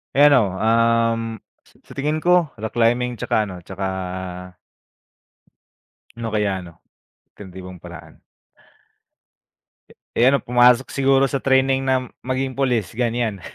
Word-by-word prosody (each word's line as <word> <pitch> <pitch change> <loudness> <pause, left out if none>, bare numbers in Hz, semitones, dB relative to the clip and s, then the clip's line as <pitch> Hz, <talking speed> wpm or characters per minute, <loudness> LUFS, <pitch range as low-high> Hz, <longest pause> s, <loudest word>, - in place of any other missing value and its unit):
Eh, 140 - +5
ano, 125 -10 +4
um, 115 +2 +2 0.5
sa - - -25
sa - - -19
tingin 150 +3 -1
ko 180 -2 +4
rock 110 0 -6
climbing 120 0 +1
tsaka 110 - 0
ano, 95 -3 -7
tsaka. 95 +3 -6 2.3
Ano 115 -1 -5
kaya 105 -3 -1
'no, 85 -2 -14 0.5
alternatibong 90 -2 -11
paraan? - - -12 1.9
Eh, 120 - +4
ano 140 - +2
pumasok 125 +1 +4
siguro 135 0 +3
sa 135 0 -3
training 135 0 +2
na 130 -1 0 0.2
maging 130 +1 -2
pulis 125 -8 -1
ganyan. 115 -4 -1
120 Hz, 120 wpm, -21 LUFS, 110-135 Hz, 2.3 s, Eh